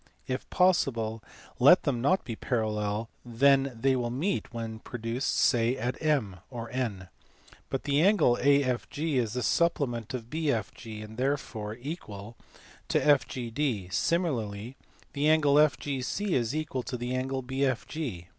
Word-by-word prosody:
If 130 Hz, +1 st, -4 dB
possible 115 Hz, -, +2 dB, 0.4 s
let 145 Hz, +9 st, +7 dB
them 130 Hz, -6 st, 0 dB
not 185 Hz, +9 st, +2 dB
be 115 Hz, -, -5 dB
parallel, 110 Hz, -2 st, -1 dB, 0.2 s
then 135 Hz, +3 st, +3 dB
they 135 Hz, +2 st, +3 dB
will 120 Hz, -2 st, -1 dB
meet 155 Hz, +9 st, -2 dB
when 115 Hz, -2 st, -5 dB
produced 115 Hz, +2 st, -3 dB
say 120 Hz, +2 st, +3 dB
at 125 Hz, 0 st, -2 dB
M 140 Hz, -, +1 dB
(or 115 Hz, -3 st, -7 dB
N). 110 Hz, -8 st, -3 dB, 0.6 s
But 135 Hz, -, -3 dB
the 145 Hz, +1 st, +2 dB
angle 190 Hz, -, +4 dB
AFG 140 Hz, +2 st, +1 dB
is 115 Hz, -4 st, 0 dB
the 125 Hz, -1 st, -2 dB
supplement 130 Hz, -, 0 dB
of 120 Hz, -1 st, -7 dB
BFG, 115 Hz, -7 st, -3 dB
and 110 Hz, -, -10 dB
is 110 Hz, -, -12 dB
therefore 125 Hz, -6 st, -2 dB
equal 115 Hz, -, -7 dB, 0.5 s
to -, -, +2 dB
FGD: 125 Hz, -7 st, 0 dB
similarly 120 Hz, -, -1 dB, 0.4 s
the 145 Hz, +2 st, +2 dB
angle 155 Hz, -3 st, +4 dB
FGC 145 Hz, +5 st, +1 dB
is 125 Hz, -2 st, +1 dB
equal 155 Hz, -4 st, -2 dB
to 125 Hz, -, -5 dB
the 120 Hz, +1 st, -3 dB
angle 130 Hz, +1 st, -2 dB
BFG. 130 Hz, -, -2 dB
130 Hz, 140 wpm, -29 LUFS, 115-145 Hz, 0.6 s, let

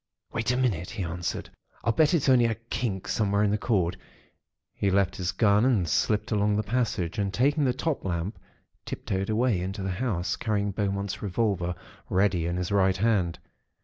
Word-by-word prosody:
"'Wait 115 Hz, 0 st, -1 dB
a 125 Hz, -, 0 dB
minute,' 105 Hz, -10 st, 0 dB
he 95 Hz, -, -4 dB
answered. 85 Hz, 0 st, -4 dB, 0.3 s
'I'll 115 Hz, -, +2 dB
bet 155 Hz, +8 st, +3 dB
it's 150 Hz, -, +1 dB
only 125 Hz, -3 st, +5 dB
a 115 Hz, -1 st, +1 dB
kink 115 Hz, -3 st, -4 dB
somewhere 100 Hz, -1 st, +1 dB
in 100 Hz, -, +2 dB
the 105 Hz, -, +2 dB
cord.' 95 Hz, -6 st, +1 dB, 0.8 s
He 100 Hz, -, 0 dB
left 95 Hz, -1 st, +2 dB
his 90 Hz, 0 st, -1 dB
gun, 100 Hz, +1 st, +3 dB
and 115 Hz, -9 st, +2 dB
slipped 105 Hz, +8 st, +1 dB
along 105 Hz, -1 st, +2 dB
the 105 Hz, -, +1 dB
passage, 105 Hz, -6 st, -1 dB
and 100 Hz, -1 st, 0 dB
taking 140 Hz, +7 st, +2 dB
the 130 Hz, -, +3 dB
top 160 Hz, -4 st, -2 dB
lamp, 90 Hz, +2 st, -3 dB, 0.4 s
tip -, -, -7 dB
toed 95 Hz, +1 st, -1 dB
away 110 Hz, -3 st, +2 dB
into 95 Hz, +2 st, -4 dB
the 95 Hz, -, -1 dB
house, 90 Hz, -4 st, -1 dB
carrying 105 Hz, -2 st, 0 dB
Beaumont's 100 Hz, 0 st, -2 dB
revolver 95 Hz, -3 st, 0 dB, 0.3 s
ready 95 Hz, -3 st, +2 dB
in 85 Hz, +1 st, -1 dB
his 90 Hz, +2 st, -2 dB
right 95 Hz, -2 st, +3 dB
hand. 95 Hz, -5 st, +1 dB
100 Hz, 185 wpm, -27 LUFS, 95-115 Hz, 0.8 s, only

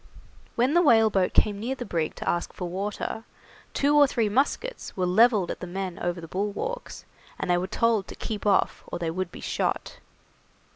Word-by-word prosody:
When 250 Hz, +5 st, +2 dB
the 345 Hz, -, +5 dB
whaleboat 220 Hz, -, +4 dB
came 205 Hz, -2 st, +2 dB
near 245 Hz, +5 st, -2 dB
the 245 Hz, -, -6 dB
brig 165 Hz, -6 st, -2 dB
to -, -, -7 dB
ask 175 Hz, -, -1 dB
for 180 Hz, -, -5 dB
water, 200 Hz, +4 st, -4 dB, 0.5 s
two 285 Hz, +1 st, +3 dB
or 290 Hz, -1 st, +7 dB
three 230 Hz, -5 st, 0 dB
muskets 280 Hz, -, -1 dB
were 185 Hz, -, +1 dB
levelled 205 Hz, 0 st, +4 dB
at -, -, -6 dB
the 180 Hz, -, -6 dB
men 185 Hz, 0 st, -4 dB
over 175 Hz, 0 st, -2 dB
the 165 Hz, -, -8 dB
bulwarks, 210 Hz, -, -4 dB, 0.3 s
and -, -, -1 dB
they 175 Hz, -, +4 dB
were 185 Hz, -, -2 dB
told 225 Hz, -1 st, +1 dB
to -, -, -9 dB
keep 210 Hz, -2 st, -4 dB
off, 200 Hz, -2 st, +2 dB
or -, -, -4 dB
they 170 Hz, -2 st, -2 dB
would 185 Hz, +1 st, -3 dB
be -, -, -10 dB
shot. -, -, -2 dB
205 Hz, 195 wpm, -26 LUFS, 180-235 Hz, 0.5 s, or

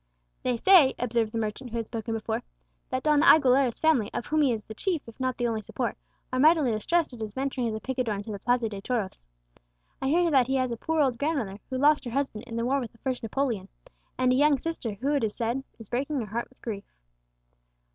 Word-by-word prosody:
"They 250 Hz, -2 st, 0 dB
say," 330 Hz, -2 st, +6 dB
observed 230 Hz, -2 st, 0 dB
the 230 Hz, -, -3 dB
merchant 225 Hz, +3 st, -3 dB
who 235 Hz, -, -4 dB
had 230 Hz, -, -2 dB
spoken 225 Hz, 0 st, -4 dB
before, 220 Hz, -, -2 dB, 0.5 s
"that 255 Hz, -, -2 dB
Don 300 Hz, -1 st, +4 dB
Aguilera's 270 Hz, -6 st, +5 dB
family, 290 Hz, -10 st, +2 dB
of -, -, -2 dB
whom 310 Hz, 0 st, +1 dB
he 275 Hz, -4 st, +4 dB
is 220 Hz, -2 st, -2 dB
the 220 Hz, -, -9 dB
chief 340 Hz, -, -2 dB
if 230 Hz, -, -13 dB
not 255 Hz, -1 st, -1 dB
the 245 Hz, -, -1 dB
only 225 Hz, -2 st, -1 dB
support, -, -, -3 dB, 0.4 s
are 255 Hz, -, +1 dB
mightily 305 Hz, -3 st, +5 dB
distressed 300 Hz, +8 st, 0 dB
at 240 Hz, -, -10 dB
his 215 Hz, -2 st, -5 dB
venturing 265 Hz, -2 st, -1 dB
as 220 Hz, -, -2 dB
a -, -, -4 dB
picador 250 Hz, -2 st, -2 dB
into 205 Hz, +2 st, -6 dB
the 200 Hz, -, -5 dB
Plaza 245 Hz, 0 st, +1 dB
de 200 Hz, -2 st, -6 dB
Toros. 220 Hz, -4 st, -2 dB, 0.8 s
I 265 Hz, -, 0 dB
hear 340 Hz, +4 st, +3 dB
that 260 Hz, -4 st, +4 dB
he 265 Hz, -, 0 dB
has 255 Hz, -2 st, +1 dB
a -, -, -1 dB
poor 320 Hz, +7 st, 0 dB
old 255 Hz, -4 st, +1 dB
grandmother, 275 Hz, -10 st, -1 dB
who 260 Hz, -, -2 dB
lost 295 Hz, +3 st, +4 dB
her -, -, -3 dB
husband 255 Hz, -4 st, -2 dB
in 230 Hz, -, -6 dB
the 230 Hz, 0 st, -1 dB
war 275 Hz, +3 st, +2 dB
with 245 Hz, -3 st, -6 dB
the -, -, -21 dB
first 255 Hz, 0 st, -3 dB
Napoleon; 225 Hz, -4 st, -2 dB, 0.5 s
and 255 Hz, 0 st, +3 dB
a -, -, +3 dB
young 290 Hz, +1 st, +4 dB
sister 265 Hz, -6 st, -4 dB
who, 275 Hz, +8 st, -1 dB
it 285 Hz, -, +1 dB
is 215 Hz, -2 st, -1 dB
said, 240 Hz, +3 st, -1 dB
is 225 Hz, -, -11 dB
breaking 275 Hz, +5 st, -1 dB
her 230 Hz, -, -2 dB
heart 225 Hz, +4 st, -4 dB
with 260 Hz, -, -26 dB
grief." 205 Hz, -4 st, -5 dB
250 Hz, 240 wpm, -27 LUFS, 225-275 Hz, 0.8 s, say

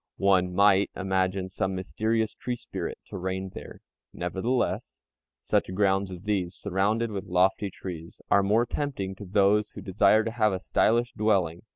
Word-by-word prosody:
One 90 Hz, -2 st, +2 dB
might 100 Hz, 0 st, +5 dB
imagine 95 Hz, -1 st, 0 dB
some 95 Hz, 0 st, -2 dB
mysterious 110 Hz, +4 st, -1 dB
"tree 125 Hz, -, -4 dB
spirit" -, -, -6 dB
to -, -, -7 dB
reign 95 Hz, +1 st, -3 dB
there. -, -, -10 dB, 0.3 s
Nevertheless, 100 Hz, +8 st, -2 dB, 0.4 s
such -, -, 0 dB
grounds 95 Hz, -1 st, +2 dB
as 90 Hz, -1 st, -9 dB
these, 95 Hz, -4 st, -1 dB
surrounded 105 Hz, +4 st, 0 dB
with 100 Hz, -2 st, -4 dB
lofty 95 Hz, +3 st, +2 dB
trees, 85 Hz, -3 st, -8 dB
are 100 Hz, -, +6 dB
more 105 Hz, +5 st, +2 dB
tempting 120 Hz, -8 st, -3 dB
to 100 Hz, -, -8 dB
those 100 Hz, +2 st, +3 dB
who -, -, -7 dB
desire 100 Hz, +3 st, +3 dB
to 115 Hz, -, -3 dB
have 110 Hz, -3 st, +2 dB
a 95 Hz, -, -2 dB
stylish 120 Hz, +5 st, +1 dB
dwelling. 95 Hz, -6 st, +1 dB
100 Hz, 160 wpm, -27 LUFS, 95-110 Hz, 0.4 s, are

